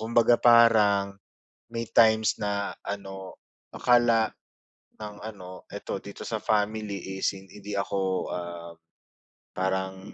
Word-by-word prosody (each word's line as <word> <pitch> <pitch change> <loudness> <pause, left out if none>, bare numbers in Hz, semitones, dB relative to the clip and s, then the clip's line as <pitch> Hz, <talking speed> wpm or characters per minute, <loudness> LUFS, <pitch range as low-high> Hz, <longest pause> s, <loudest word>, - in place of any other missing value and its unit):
kumbaga 115 +1 +3
parang 105 -4 +5 0.6
may 115 -1 -4
times 110 -1 +4
na 100 -1 -2
ano, 95 -1 -7 0.4
akala 120 -3 +3 0.7
ng 105 -1 -8
ano, 95 -4 -10
eto - - -4
dito - - -10
sa - - -3
family 105 -3 -2
is 95 - 0
in 95 0 -13
hindi 105 0 -8
ako, 95 -1 -1
ah, 85 -1 -6 0.8
parang 95 +1 -3
100 Hz, 115 wpm, -27 LUFS, 95-110 Hz, 0.8 s, parang